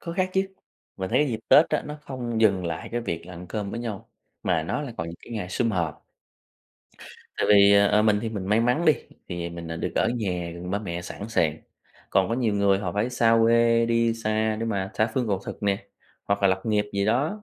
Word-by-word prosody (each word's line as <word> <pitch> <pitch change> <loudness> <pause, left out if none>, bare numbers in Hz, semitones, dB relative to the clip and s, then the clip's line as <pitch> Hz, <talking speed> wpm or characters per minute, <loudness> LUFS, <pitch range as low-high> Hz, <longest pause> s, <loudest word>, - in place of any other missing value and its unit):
Có 170 - -6
khác 185 0 +1
chứ, 190 - +3 0.5
mình 95 -1 -4
thấy - - +3
cái 150 - +2
dịp 115 -3 -3
Tết 155 - +7
á, 155 - 0
nó 150 0 -6
không 120 -5 -4
dừng 100 -5 +3
lại 80 -1 -4
cái 120 - -1
việc 85 -7 -4
là 90 - -10
ăn 90 +2 -9
cơm 105 -2 -4
với 115 - -4
nhau, 110 -5 -6 0.3
mà 80 -2 +1
nó 85 - -2
là 130 -5 -6
còn 80 - -3
những 85 - -8
cái 120 - -10
ngày 95 -5 -4
sum 115 +4 0
họp. 85 -6 -2 1.3
Tại - - 0
vì, 100 -1 +7
ờ, 100 0 +6
ờ, 105 +1 +3
mình 105 -1 +3
thì 115 - -2
mình 100 -4 -5
may 105 +3 +3
mắn 125 +8 +1
đi, 155 - +7 0.4
thì 85 -1 -4
mình, 85 -1 -7
ờ, 80 - -4
được - - -3
ở - - +2
nhà 90 -6 -2
gần 90 +1 -7
ba 100 - 0
mẹ 85 -5 -5
sẵn 100 +4 -7
sàng, 80 -8 +1 0.5
còn 95 -1 +3
có 115 - 0
nhiều 115 -5 0
người 100 -1 +3
họ 95 -3 -3
phải 105 +5 0
xa 115 -2 +3
quê, 115 0 +4
đi 115 0 +2
xa 110 -1 0
để - - -1
mà 95 -3 -2
tha 110 - +2
phương 125 -2 0
cầu 100 -2 +1
thực - - -7
nè, 100 0 0 0.4
hoặc 100 0 -1
là 100 - +5
lập 95 0 +1
nghiệp 105 -2 +1
gì 100 0 0
đó, 150 - 0
105 Hz, 250 wpm, -25 LUFS, 95-115 Hz, 1.3 s, Tết